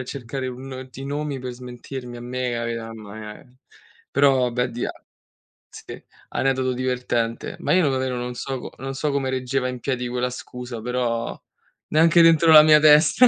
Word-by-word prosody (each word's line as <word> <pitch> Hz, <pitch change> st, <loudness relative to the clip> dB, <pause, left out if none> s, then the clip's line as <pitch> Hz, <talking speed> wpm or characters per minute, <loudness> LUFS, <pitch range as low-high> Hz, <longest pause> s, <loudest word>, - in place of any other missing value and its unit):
a -, -, -4 dB
cercare 130 Hz, 0 st, -5 dB
un 130 Hz, +1 st, -8 dB
ti 130 Hz, -, -11 dB
i -, -, -6 dB
nomi 145 Hz, 0 st, -3 dB
per 125 Hz, 0 st, -5 dB
smentirmi 125 Hz, 0 st, -8 dB
a 120 Hz, -, -9 dB
me, 125 Hz, 0 st, -3 dB
a 115 Hz, -, -2 dB
e 115 Hz, -, -2 dB
am 115 Hz, -2 st, -9 dB
e 110 Hz, +4 st, -10 dB, 0.5 s
Però 135 Hz, -3 st, +3 dB
beh, 125 Hz, +1 st, -1 dB
di 120 Hz, -, -4 dB
a -, -, -3 dB, 0.8 s
sì, -, -, -11 dB, 0.3 s
aneddoto 130 Hz, -1 st, 0 dB
divertente. 125 Hz, -2 st, -2 dB
Ma -, -, 0 dB
io 180 Hz, -5 st, +4 dB
davvero, 130 Hz, -1 st, -1 dB
non 125 Hz, 0 st, -4 dB
so 130 Hz, +1 st, -5 dB
c -, -, -23 dB
non 135 Hz, +1 st, -5 dB
so 150 Hz, +1 st, -1 dB
come 140 Hz, -1 st, -1 dB
reggeva 130 Hz, 0 st, -1 dB
in 125 Hz, 0 st, -5 dB
piedi 125 Hz, -1 st, -2 dB
quella 125 Hz, +1 st, -1 dB
scusa, 125 Hz, -2 st, -7 dB
però 120 Hz, -1 st, -2 dB, 0.5 s
neanche 165 Hz, +2 st, +5 dB
dentro 165 Hz, -1 st, +6 dB
la 155 Hz, -1 st, +11 dB
mia 155 Hz, -1 st, +7 dB
testa, 155 Hz, +10 st, +6 dB
130 Hz, 185 wpm, -23 LUFS, 125-135 Hz, 0.8 s, la